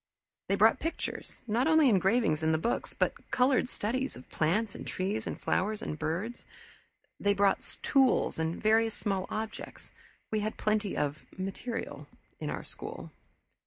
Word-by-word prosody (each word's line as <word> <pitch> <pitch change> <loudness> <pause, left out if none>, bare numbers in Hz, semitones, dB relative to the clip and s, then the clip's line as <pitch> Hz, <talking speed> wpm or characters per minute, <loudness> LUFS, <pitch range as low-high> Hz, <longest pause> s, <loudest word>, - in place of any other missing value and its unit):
They - - +4
brought - - +5
pictures, 330 +1 -4
not 235 +4 +1
only 315 -1 +6
the 255 - +6
engravings 190 -4 +3
in 160 0 +2
the - - +3
books 230 +9 -1
but - - -1
colored 255 0 +3
studies 255 +6 -1
of 125 - -12
plants 190 +7 +1
and - - -8
trees 205 +4 -2
and - - -4
flowers 210 +2 0
and 155 - -4
birds. 190 +10 -2 0.8
They 200 0 +2
brought 200 0 +1
tools 265 -10 +3
and 160 +1 -1
various 220 0 +3
small 195 -2 -1
objects 220 +1 -5 0.4
we 215 - +1
had 215 +1 -2
plenty 215 -2 0
of 145 +1 -1
"material" 195 +5 -4 0.3
in - - -3
our - - -4
school. - - -8
215 Hz, 160 wpm, -30 LUFS, 185-235 Hz, 0.8 s, only